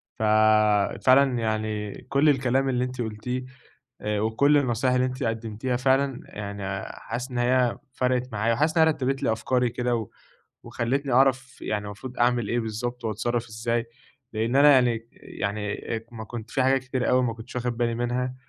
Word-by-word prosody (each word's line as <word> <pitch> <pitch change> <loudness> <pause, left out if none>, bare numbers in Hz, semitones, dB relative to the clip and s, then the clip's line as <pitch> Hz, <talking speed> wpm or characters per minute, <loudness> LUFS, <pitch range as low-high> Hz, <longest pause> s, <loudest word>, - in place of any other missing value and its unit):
ف 110 - -4 0.8
فعلًا 130 -1 +5
يعني 110 -2 -2 0.2
كل 140 +2 +4
الكلام 135 -1 +2
اللي 125 -1 0
أنتِ 125 -1 -4
قُلتيه 120 +3 -4 0.6
آآ 105 0 -1
وكل 125 +7 +3
النصايح 125 -1 +1
اللي 125 0 +2
أنتِ 130 0 -4
قدمتيها 115 +2 -2
فعلًا، 135 0 +1
يعني 100 -2 -5
حاسس 125 +4 -6
إن 125 - -4
هي 125 0 +2 0.2
فرَقت 125 0 0
معايا، 110 +2 +1
وحاسس 155 +7 +1
إن 160 - +7
هي 160 - +5
رتّبت 135 -2 -1
لي 115 - +2
أفكاري 125 +3 +1
كده، 125 0 -1
و 110 -3 -4 0.6
وخلّتني 135 +3 -2
أعرف 130 0 +2
يعني 105 -1 -2
المفروض 120 +5 -8
أعمل 120 -3 +2
إيه 120 0 0
بالضبط 120 +2 -4
وأتصرف 115 +2 -1
إزاي، 115 +2 -2 0.5
لإن 115 +4 0
أنا 145 +1 +7
يعني 120 -3 +2
يعني 105 0 -4 0.4
ما 110 -1 -7
كنت 115 -1 -8
في 135 - +1
حاجات 135 0 +2
كتيرة 130 -1 -2
أوي 130 0 +4
ما 115 -2 -1
كنتش 115 +2 -10
واخد 125 -1 -2
بالي 120 -1 0
منها، 125 +2 -2
120 Hz, 170 wpm, -25 LUFS, 110-130 Hz, 0.8 s, إن